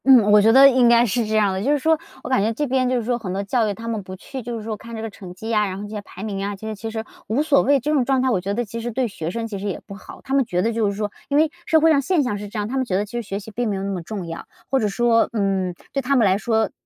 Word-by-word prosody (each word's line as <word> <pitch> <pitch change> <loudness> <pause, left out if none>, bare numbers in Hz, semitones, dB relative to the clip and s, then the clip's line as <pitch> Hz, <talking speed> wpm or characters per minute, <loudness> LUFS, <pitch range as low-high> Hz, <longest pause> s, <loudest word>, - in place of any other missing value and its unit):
嗯， 245 -6 +7
我 210 0 +7
觉 220 +2 +5
得 270 +3 +9
应 255 -3 +5
该 235 0 +6
是 230 +1 0
这 220 - -1
样 205 -3 +3
的。 190 - -2
就 275 - +2
是 295 - +3
说 320 +3 +2 0.3
我 - - -6
感 260 -5 +3
觉 215 +3 +1
这 295 +6 -1
边 255 -1 +1
就 255 - +1
是 240 - -2
说 240 +1 -1
很 195 -6 -5
多 195 +1 -2
教 225 +2 +1
育 - - -1
他 225 +3 -9
们 225 -2 -2
不 185 0 -9
去 260 +7 -8
就 240 0 -5
是 220 - -7
说 220 0 -3
看 230 +2 -10
这 220 - -5
个 225 - -3
成 190 -2 -10
绩 220 +5 -7
呀， 210 -2 +2
然 190 -1 -5
后 200 - -6
这 205 - -7
些 210 -1 -5
排 195 -1 -11
名 200 -2 -3
啊， 200 0 -3
这 195 - -11
些 220 - -3
其 220 +2 -6
实 220 0 -4 0.2
无 250 +7 +1
所 295 -3 +4
谓， 280 0 +3
这 295 +5 -2
种 280 -4 +3
状 265 +1 +1
态 260 - +1
我 190 -6 +1
觉 200 +2 -2
得 240 - -1
其 230 +2 -6
实 240 - -3
对 245 +2 -1
学 165 -6 -5
生 230 +5 -3
其 205 -3 -5
实 205 - -4
也 195 - -3
不 200 - -9
好。 200 - -11
他 270 - -5
们 275 -1 +4
觉 180 -6 -1
得 230 +1 0
就 220 -2 +1
是 200 - -5
说 210 -1 -2 0.2
因 285 - +2
为 310 +1 +3 0.2
社 320 - +5
会 320 +1 +5
上 285 -3 +4
现 320 +2 +1
象 245 -5 -1
是 205 - -6
这 210 - -8
样， 210 0 -1
他 260 +4 -3
们 260 - 0
觉 190 - -2
得 200 +2 +1
其 205 - -16
实 240 - -2
学 200 -3 -5
习 210 +2 -9
并 235 +2 -2
没 200 - -1
有 190 - -4
那 200 - -2
么 185 -2 -3
重 185 +2 -6
要， 165 0 -7 0.2
或 270 - +3
者 215 - +1
说， 230 +3 +2
嗯， 195 -4 0 0.2
对 275 - 0
他 275 +2 +1
们 235 -5 +4
来 190 -1 +4
说 220 -1 +1
225 Hz, 390 characters per minute, -22 LUFS, 200-250 Hz, 0.3 s, 得